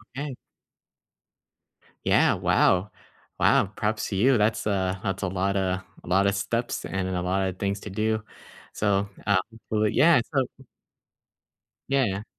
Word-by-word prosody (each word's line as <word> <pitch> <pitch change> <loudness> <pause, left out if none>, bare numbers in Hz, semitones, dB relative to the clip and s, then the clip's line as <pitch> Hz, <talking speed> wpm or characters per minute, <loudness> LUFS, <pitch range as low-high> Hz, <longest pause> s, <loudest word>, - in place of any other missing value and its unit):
Okay. 140 -2 -5 1.7
Yeah, - - +4
wow. 95 +3 +2 0.5
Wow, 95 - +3
props 105 0 -1
to 100 - -3
you, 125 +6 +4
that's, 105 +1 +1
uh, 95 -2 0
that's 95 -3 -2
a 95 - -1
lotta 95 0 -1 0.2
a - - -14
lotta 100 +2 +3
steps, 115 +4 -2
and 95 -1 -2
a 90 -1 -2
lotta 95 +1 0
things 100 +2 -2
to - - -7
do. 110 +2 -1 0.5
So, 100 -1 +1 0.2
uh 100 -2 +4 0.3
well, 105 0 +2
yeah, 155 +5 +5
so 135 -2 +2 1.4
Yeah. 115 -8 +1
100 Hz, 130 wpm, -26 LUFS, 95-110 Hz, 1.7 s, yeah